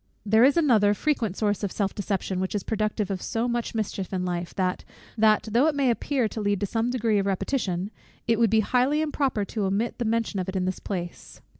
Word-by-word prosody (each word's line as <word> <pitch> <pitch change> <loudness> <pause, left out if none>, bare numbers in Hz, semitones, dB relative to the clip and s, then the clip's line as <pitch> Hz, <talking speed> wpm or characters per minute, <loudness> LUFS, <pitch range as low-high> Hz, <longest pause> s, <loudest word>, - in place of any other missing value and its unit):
There 220 +3 +5
is 275 +4 +5
another 220 -10 +4
frequent 230 -8 -1
source 205 -2 0
of 200 -3 -2
self 200 -2 -1
deception, 195 -2 -2
which 190 +2 -2
is 205 - -1
productive 215 -1 -1
of 190 -2 -3
so 230 +1 -1
much 240 -1 -2
mischief 200 -3 -3
in 185 -1 -2
life, 175 -1 -3
that, 185 -1 -1 0.3
though 220 +4 +3
it 310 - +1
may 275 -3 +3
appear 250 0 0
to 220 - -5
lead 205 -1 0
to - - +1
some 225 +4 -1
degree 230 -4 +1
of 195 - -1
repetition, 195 -2 -1 0.4
it 230 -1 +2
would 230 -2 +4
be 220 +1 +4
highly 255 +7 +2
improper 275 -8 -1
to 210 0 -3
omit 205 +6 -1
the 240 - -1
mention 225 -2 0
of 185 - -3
it 190 - -5
in 185 -1 0
this 185 0 -2
place. 175 -3 -6
215 Hz, 225 wpm, -26 LUFS, 195-235 Hz, 0.4 s, There